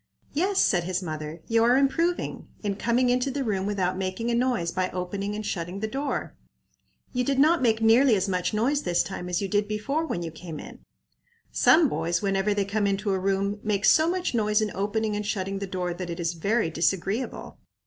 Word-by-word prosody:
"Yes," 380 Hz, +6 st, +1 dB
said 175 Hz, -4 st, +3 dB
his 185 Hz, +1 st, -2 dB
mother; 155 Hz, 0 st, -6 dB
"you 225 Hz, 0 st, +3 dB
are 245 Hz, +2 st, +5 dB
improving, 330 Hz, +6 st, 0 dB, 0.2 s
in 200 Hz, -1 st, -1 dB
coming 240 Hz, +4 st, +1 dB
into 250 Hz, +2 st, +1 dB
the 275 Hz, +1 st, -2 dB
room 200 Hz, -4 st, -1 dB
without 185 Hz, -2 st, -1 dB
making 190 Hz, +5 st, -2 dB
a -, -, 0 dB
noise 235 Hz, -8 st, +1 dB
by 185 Hz, +1 st, -1 dB
opening 195 Hz, +3 st, -4 dB
and 215 Hz, 0 st, -5 dB
shutting 180 Hz, -1 st, -4 dB
the 220 Hz, -, -2 dB
door. 275 Hz, +5 st, -3 dB, 0.8 s
You 250 Hz, 0 st, +1 dB
did 275 Hz, +1 st, 0 dB
not 315 Hz, +4 st, +4 dB
make 225 Hz, -2 st, +2 dB
nearly 230 Hz, +2 st, +6 dB
as 195 Hz, 0 st, 0 dB
much 180 Hz, -2 st, 0 dB
noise 250 Hz, +7 st, +1 dB
this 175 Hz, -1 st, +1 dB
time 180 Hz, -2 st, -6 dB
as 180 Hz, +2 st, -1 dB
you -, -, -1 dB
did 205 Hz, +2 st, +1 dB
before 245 Hz, +9 st, -1 dB
when 175 Hz, -, -3 dB
you 165 Hz, -, -5 dB
came 160 Hz, -1 st, -8 dB
in. -, -, -10 dB, 0.7 s
Some 320 Hz, -1 st, +5 dB
boys, 170 Hz, -, -1 dB
whenever 195 Hz, +1 st, 0 dB
they 205 Hz, -1 st, +1 dB
come 205 Hz, +1 st, 0 dB
into 200 Hz, +1 st, 0 dB
a 190 Hz, -, 0 dB
room, 195 Hz, +2 st, 0 dB
make 210 Hz, -1 st, 0 dB
so 315 Hz, +1 st, +5 dB
much 360 Hz, -3 st, -1 dB
noise 210 Hz, -2 st, +2 dB
in 215 Hz, -2 st, -1 dB
opening 210 Hz, +2 st, -1 dB
and 210 Hz, -, -2 dB
shutting 195 Hz, -2 st, -2 dB
the 200 Hz, -, -4 dB
door 180 Hz, -2 st, -2 dB
that 180 Hz, 0 st, -6 dB
it 170 Hz, +1 st, -5 dB
is 170 Hz, 0 st, -1 dB
very 200 Hz, +2 st, 0 dB
disagreeable. 190 Hz, +8 st, -2 dB
205 Hz, 210 wpm, -26 LUFS, 185-235 Hz, 0.8 s, nearly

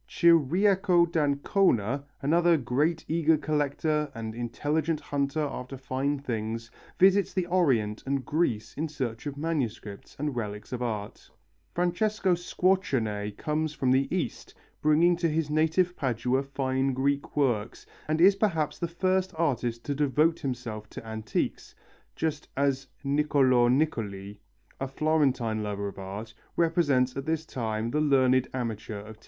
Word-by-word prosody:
Ciriaco 175 Hz, +3 st, +4 dB
d'Ancona, 140 Hz, -, +1 dB, 0.2 s
another 170 Hz, +3 st, +4 dB
great 150 Hz, +5 st, 0 dB
eager 160 Hz, 0 st, +3 dB
collector 150 Hz, 0 st, 0 dB
and 110 Hz, -1 st, -5 dB
intelligent 145 Hz, +7 st, -1 dB
hunter 140 Hz, +2 st, -1 dB
after 135 Hz, -2 st, -5 dB
fine 135 Hz, +2 st, -1 dB
things, 115 Hz, -4 st, -4 dB, 0.3 s
visits 195 Hz, 0 st, +4 dB
the 185 Hz, -2 st, +1 dB
Orient 130 Hz, -, +1 dB
and 135 Hz, -1 st, -1 dB
Greece 115 Hz, -9 st, -1 dB
in 155 Hz, +3 st, -2 dB
search 130 Hz, -4 st, -4 dB
of 140 Hz, -1 st, -5 dB
manuscripts 125 Hz, -10 st, -4 dB
and 145 Hz, -2 st, -2 dB
relics 105 Hz, -1 st, -5 dB
of 125 Hz, -, -3 dB
art; 105 Hz, -4 st, -4 dB, 0.5 s
Francesco 185 Hz, +2 st, +1 dB
Squarcione 130 Hz, -, 0 dB
comes 155 Hz, 0 st, -2 dB
from 130 Hz, -3 st, +1 dB
the 135 Hz, +1 st, +3 dB
East, -, -, -3 dB, 0.3 s
bringing 160 Hz, +4 st, +4 dB
to 170 Hz, -1 st, +1 dB
his 155 Hz, -1 st, -1 dB
native 160 Hz, +4 st, +2 dB
Padua 125 Hz, 0 st, 0 dB
fine 135 Hz, -1 st, -1 dB
Greek 140 Hz, +3 st, -1 dB
works, 120 Hz, -5 st, 0 dB, 0.2 s
and 155 Hz, +1 st, 0 dB
is 190 Hz, +3 st, +7 dB
perhaps 165 Hz, -8 st, 0 dB
the 170 Hz, -, -1 dB
first 185 Hz, +2 st, 0 dB
artist 120 Hz, -7 st, -1 dB
to 145 Hz, -, -1 dB
devote 150 Hz, +3 st, +2 dB
himself 120 Hz, -5 st, -5 dB
to -, -, -9 dB
antiques, 110 Hz, -1 st, -3 dB, 0.4 s
just 155 Hz, -2 st, -2 dB
as 135 Hz, -1 st, +1 dB, 0.2 s
Niccolo 140 Hz, -4 st, +3 dB
Niccoli, 105 Hz, -8 st, -1 dB, 0.4 s
a 135 Hz, -, -2 dB
Florentine 135 Hz, -6 st, +1 dB
lover 100 Hz, -1 st, -3 dB
of 100 Hz, -, -8 dB
art, 100 Hz, +4 st, -7 dB, 0.2 s
represents 145 Hz, -7 st, +2 dB
at 135 Hz, +2 st, -5 dB
this 160 Hz, 0 st, -1 dB
time 115 Hz, -4 st, -3 dB
the 150 Hz, -, +1 dB
learned 130 Hz, -3 st, +3 dB
amateur 115 Hz, -4 st, -4 dB
of 110 Hz, +1 st, -11 dB
taste. -, -, -29 dB
140 Hz, 140 wpm, -28 LUFS, 120-160 Hz, 0.5 s, is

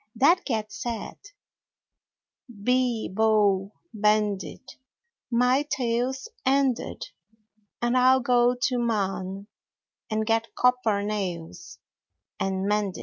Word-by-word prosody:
That 335 Hz, +7 st, +4 dB
cat 220 Hz, -5 st, -2 dB
said: 230 Hz, -3 st, -5 dB, 1.3 s
Bee 240 Hz, +1 st, 0 dB
bo 205 Hz, -1 st, +2 dB, 0.2 s
bend 210 Hz, -2 st, +2 dB
it, -, -, -11 dB, 0.5 s
My 250 Hz, +3 st, +3 dB
tail's 250 Hz, -, -1 dB, 0.2 s
ended, 265 Hz, -2 st, 0 dB, 0.7 s
And 240 Hz, +1 st, +1 dB
I'll 260 Hz, +1 st, +5 dB
go 245 Hz, 0 st, +3 dB
to 255 Hz, -2 st, 0 dB
Mann 195 Hz, -4 st, -2 dB, 0.6 s
And 220 Hz, 0 st, -1 dB
get 225 Hz, 0 st, 0 dB
copper 250 Hz, -5 st, +2 dB
nails, 185 Hz, -, -5 dB, 0.6 s
And 190 Hz, 0 st, -1 dB
mend 205 Hz, -2 st, 0 dB
it. -, -, -8 dB
225 Hz, 100 wpm, -26 LUFS, 205-250 Hz, 1.3 s, I'll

